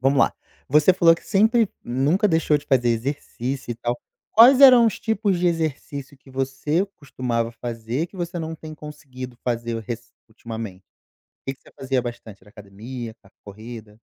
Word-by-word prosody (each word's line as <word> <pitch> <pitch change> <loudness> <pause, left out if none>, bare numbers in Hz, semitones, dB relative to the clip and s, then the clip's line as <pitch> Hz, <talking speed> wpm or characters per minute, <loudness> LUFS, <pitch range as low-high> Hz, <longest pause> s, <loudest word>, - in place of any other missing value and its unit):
Vamos 135 +2 +3
lá, - - +4 0.4
você 150 +6 +5
falou 170 -2 +6
que - - -14
sempre 220 +2 +3 0.2
nunca 140 - +2
deixou 160 -4 +2
de 145 - -7
fazer 125 -4 +2
exercício 130 +1 -3
e - - -7
tal. 120 +1 -3 0.3
Quais 250 +4 +8
eram 250 -4 +9
os 220 - -1
tipos 220 -4 0
de 180 - +1
exercício 150 -4 -2
que 135 0 -19
você 135 +7 -1
costumava 120 -5 -2
fazer, 120 +5 -4
que 190 - -16
você 175 0 -4
não 160 0 -4
tem 155 0 -9
conseguido 135 -5 -9
fazer 120 -1 -2
rec 115 +1 -5 0.3
ultimamente? 110 -4 -7 0.6
O - - -68
que 135 - -2
que - - -36
você - - -18
fazia 130 -1 0
bastante? 115 -4 -8
Era - - -19
academia, 110 +4 -8
era 100 - -22
corrida? 110 +1 -10
135 Hz, 175 wpm, -23 LUFS, 120-165 Hz, 0.6 s, eram